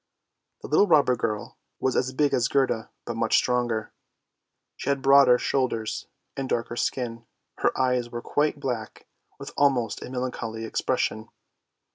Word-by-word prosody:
The - - -5
little 205 - +4
robber 145 -7 +4
girl 110 -3 -4 0.2
was 130 - 0
as 130 - +1
big 140 +1 +1
as 125 -2 +2
Gerda, 130 -5 0 0.2
but 120 - -4
much 115 0 +1
stronger; 120 -3 0 0.8
she - - -4
had 140 -1 0
broader 135 -2 +7
shoulders, 120 -5 -1 0.3
and 135 -1 -4
darker 120 0 -1
skin, 115 -2 -3 0.3
her - - +1
eyes 125 -2 +1
were 120 0 -6
quite 150 0 0
black, 120 -6 -4 0.3
with - - -8
almost 130 -5 +1
a - - -7
melancholy 125 -3 -4
expression. 110 0 -1
125 Hz, 145 wpm, -26 LUFS, 115-135 Hz, 0.8 s, broader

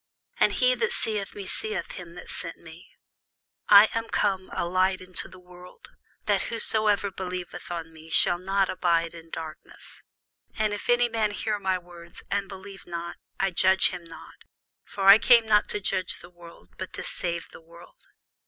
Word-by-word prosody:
And - - +4
he 255 0 +3
that 225 -3 0
seeth 210 -3 -1
me 200 - -6
seeth 425 - -4
him 170 -1 -9
that 180 - -8
sent 165 -1 -5
me. 165 +1 -14 0.8
I 205 +2 +10
am 230 0 -2
come 190 -2 0
a - - -2
light 185 +2 +1
into 185 -1 -5
the 185 - -14
world, 180 - -15 0.3
that - - +1
whosoever 215 -3 +1
believeth 180 -1 -6
on 165 -2 -5
me 160 0 -14
should 175 - +4
not 195 +1 +1
abide 170 -2 +1
in 165 -1 -12
darkness. 160 -1 -10 0.5
And 215 -1 +1
if 205 - -6
any 240 0 +4
man 225 -2 0
hear 210 0 -2
my 190 -2 0
words, 175 -1 -13
and 200 -1 -1
believe 195 0 -10
not, 170 0 -6 0.2
I 195 0 +1
judge 190 +2 +4
him 175 - -7
not: 165 -1 -13 0.5
for 200 - -6
I 195 +2 +9
came 235 -2 +6
not 210 -1 +3
to 210 - -3
judge 185 -2 -2
the 175 - -14
world, 170 -1 -15
but 185 - -6
to - - -5
save 170 -1 -3
the - - -13
world. 170 - -17
185 Hz, 180 wpm, -26 LUFS, 175-205 Hz, 0.8 s, I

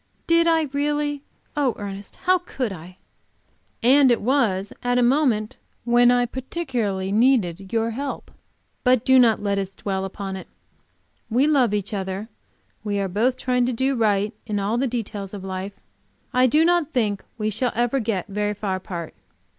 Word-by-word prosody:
"Did 335 0 +4
I, 325 -1 +4
really? 290 0 -1 0.3
Oh, 280 -5 +1
Ernest, 200 -1 -7
how 370 0 +4
could 265 - -4
I?" 180 +1 -11 0.9
"And 265 +2 +6
it 240 - +3
was 210 -6 +1
at 245 0 +1
a 250 - +4
moment 240 -5 +2 0.3
when 240 0 +5
I 245 0 +3
particularly 240 - -3
needed 200 -6 +2
your 230 0 0
help. 275 +5 -5 0.5
But 250 -2 +3
do 260 0 +6
not 225 -4 +4
let 200 -1 0
us 195 -1 -3
dwell 195 0 -3
upon 195 0 -5
it. 190 - -10 0.8
We 245 +5 +3
love 275 -7 +3
each 205 +1 -2
other; 195 +2 -4 0.5
we 205 -1 -1
are 195 - 0
both 225 +7 +1
trying 250 -1 +1
to 255 - 0
do 265 +4 +1
right 210 -2 +1
in 210 -2 -1
all 210 +4 0
the 270 - +1
details 210 -4 -4
of 195 - -8
life. 190 +1 -5 0.6
I 255 +1 +5
do 305 +6 +4
not 345 -3 +2
think 210 -6 0
we 215 -1 -1
shall 245 +4 0
ever 240 +3 +1
get 215 -6 -2
very 210 +1 -2
far 195 -2 -2
apart." 175 -3 -6
230 Hz, 170 wpm, -23 LUFS, 200-260 Hz, 0.9 s, And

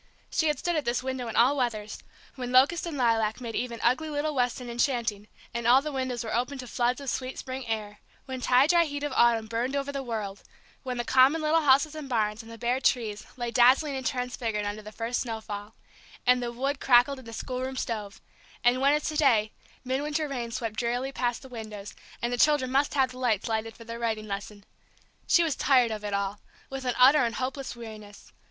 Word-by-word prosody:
She 320 - +1
had 300 - +1
stood 345 -1 -1
at 305 - 0
this 240 0 -1
window 260 -2 -3
in 225 - -5
all 255 +5 +5
weathers: 220 -5 -2 0.3
when 250 -2 -5
locust 280 +7 +4
and 315 -4 -4
lilac 225 -3 +1
made 235 -2 -6
even 235 -1 -3
ugly 285 +7 +2
little 300 +1 -1
Weston 250 -1 -1
enchanting, 235 -4 -1 0.3
and 235 -1 -2
all 250 +2 +7
the 305 - -3
windows 260 -3 -2
were 220 - -4
open 250 +4 -1
to 255 - -7
floods 245 +2 0
of 280 - -9
sweet 255 0 -3
spring 260 -1 -6
air; 210 -2 -4 0.3
when 260 -1 -6
tie 250 +2 +5
dry 340 +2 +4
heat 285 -1 -5
of 290 -2 -2
autumn 235 -2 +4
burned 235 +4 -2
over 280 0 -2
the 275 -1 -3
world; 215 -6 -4 0.4
when 255 -1 -4
the 240 - -1
common 265 +5 +5
little 310 +1 +2
houses 285 +1 +4
and 305 -3 -7
barns, 215 -2 0
and 225 0 -13
the 230 - -9
bare 245 +2 0
trees, 220 -6 0
lay 240 -1 -3
dazzling 260 +4 +4
and 260 -1 -2
transfigured 245 -5 -2
under 205 +1 -4
the 215 0 -10
first 230 +2 -2
snowfall, 220 -2 -5 0.5
and 250 0 +4
the 240 -1 -3
wood 270 +3 -2
crackled 260 +2 +4
in 260 - -13
the 230 - -9
schoolroom 255 +3 -4
stove; 215 -4 -4 0.4
and 245 +2 +3
when, 280 +1 +5
as 300 0 +1
to 310 - -2
day, 230 -8 +3 0.3
midwinter 295 +4 -1
rains 240 -4 -4
swept 225 -2 -4
drearily 245 +3 -1
past 245 -2 -2
the - - -10
windows, 215 -4 -8 0.3
and 240 +1 0
the 245 - -2
children 290 -3 +3
must 275 +2 +2
have 265 -2 +3
the 255 - -10
lights 225 -6 +1
lighted 225 0 -2
for 230 - -11
their 230 0 -7
writing 220 -2 -2
lesson. 205 0 -6 0.6
She 340 - +5
was 315 -4 0
tired 255 -5 +3
of 215 -1 -5
it 205 - -3
all, 200 +1 -2 0.3
with 270 -1 -5
an 250 - 0
utter 270 +4 +7
and 230 -1 -1
hopeless 265 0 -4
weariness. 215 -3 -11
245 Hz, 220 wpm, -27 LUFS, 225-270 Hz, 0.6 s, all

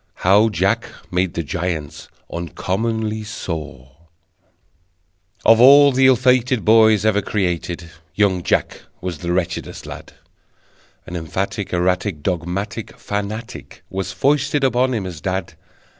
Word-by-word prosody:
How 105 +4 +5
Jack 95 0 0 0.2
Made 90 -1 0
the 85 - -1
Giants 80 -2 -4 0.3
Uncommonly 110 +6 -2
Sore 75 - -7 1.5
Of 115 0 +6
all 140 +2 +8
the 130 0 +4
ill 130 - +6
fated 125 -1 +2
Boys 110 -1 +5
ever 105 -1 +3
created 90 -4 -3 0.2
Young 100 -4 +2
Jack - - -1 0.2
was 90 -4 -5
the 85 - -3
wretchedest 90 0 -3
lad: - - -10 0.9
An 90 - -7
emphatic, 95 +4 -3
erratic, 90 -2 0
Dogmatic 95 +6 -3
fanatic 105 +3 -6
Was 95 -1 -3
foisted 145 +7 +1
upon 130 0 +2
him 105 -4 -3
as 85 -4 -7
dad! 95 -2 -3
95 Hz, 120 wpm, -20 LUFS, 90-115 Hz, 1.5 s, all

